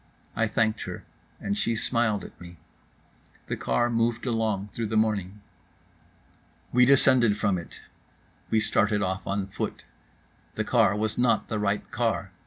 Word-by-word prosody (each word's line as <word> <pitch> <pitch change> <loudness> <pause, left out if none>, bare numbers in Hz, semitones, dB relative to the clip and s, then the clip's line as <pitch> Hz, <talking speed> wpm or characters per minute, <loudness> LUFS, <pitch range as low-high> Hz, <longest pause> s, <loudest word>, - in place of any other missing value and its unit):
I 115 - +1
thanked 110 0 0
her, - - -7 0.3
and 100 0 -2
she 105 +3 0
smiled 110 -3 0
at - - -12
me. 85 -1 -11 0.9
The - - -3
car 65 - +1
moved 115 0 0
along 110 -4 -1
through 115 -2 -3
the 110 +1 -1
morning. 105 -2 0 1.3
We 125 0 +5
descended 130 -5 +5
from 100 -4 +1
it. 85 - -11 0.7
We 110 - +3
started 105 -1 +1
off 95 +1 -3
on 100 0 -1
foot. 95 - -5 0.7
The - - -1
car 100 - +3
was 105 +1 -2
not 120 -1 +2
the 110 - -1
right 105 0 -1
car. 110 -5 -1
110 Hz, 150 wpm, -26 LUFS, 100-115 Hz, 1.3 s, We